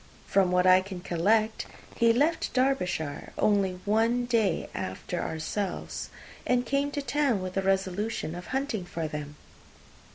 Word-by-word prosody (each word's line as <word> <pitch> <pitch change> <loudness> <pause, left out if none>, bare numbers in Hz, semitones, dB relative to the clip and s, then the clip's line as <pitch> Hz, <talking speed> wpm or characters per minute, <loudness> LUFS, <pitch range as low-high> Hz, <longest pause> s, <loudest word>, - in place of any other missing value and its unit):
From 190 -2 +3
what 180 0 +3
I 185 0 +7
can 190 -1 -7
collect, 215 +6 +1 0.3
he 230 0 +4
left 295 +7 +1
Derbyshire 180 - 0
only 200 -3 +2
one 225 +4 +2
day 225 -8 +1
after 95 - -4
ourselves, 170 +5 -3 0.3
and 250 0 +1
came 280 +3 +1
to 285 - -2
town 280 -6 +1
with 185 0 -5
the 195 - 0
resolution 195 -1 -1
of 175 0 -8
hunting 265 -7 -2
for 165 -2 -4
them. 150 -1 -6
200 Hz, 140 wpm, -28 LUFS, 180-240 Hz, 0.3 s, I